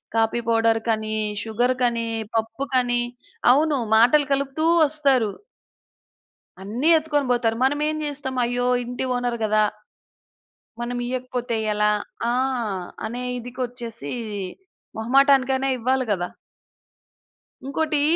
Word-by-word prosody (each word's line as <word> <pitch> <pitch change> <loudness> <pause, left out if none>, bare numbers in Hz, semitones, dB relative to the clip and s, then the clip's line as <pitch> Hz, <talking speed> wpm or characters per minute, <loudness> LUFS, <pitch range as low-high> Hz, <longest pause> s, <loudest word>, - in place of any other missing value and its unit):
Coffee 225 +1 +2
పౌడర్‌‌కనీ, 225 -1 +1 0.3
షుగర్‌కనీ 240 +1 0 0.3
పప్పుకని 245 +1 0 0.5
అవును. 295 +2 +3 0.2
మాటలు 250 +6 +5
కలుపుతూ 275 +3 -1 0.2
వస్తారు. 275 -8 +2 1.3
అన్నీ 230 +11 0
ఎత్తుకొని 295 -2 0
పోతారు. 235 -2 +1
మనమేం 300 +3 +1
చేస్తాం? 275 -3 -4
"అయ్యో! 245 +1 0 0.2
ఇంటి 245 +2 -4
ఓనెర్ 245 -1 -1
కదా!" 215 0 +3 1.2
"మనమియ్యకపోతే 245 0 -3 0.2
ఎలా?" 210 0 +2 0.4
ఆ! - - +1 0.7
అనే 245 +3 -5 0.2
ఇదికిచ్చేసి 240 - -6 0.9
మొహమాటానికైనా 270 +2 +3
ఇవ్వాలి 255 +2 +1
కదా! 175 -3 -1 1.4
ఇంకోటి 300 +2 0
245 Hz, 85 wpm, -23 LUFS, 230-270 Hz, 1.4 s, మాటలు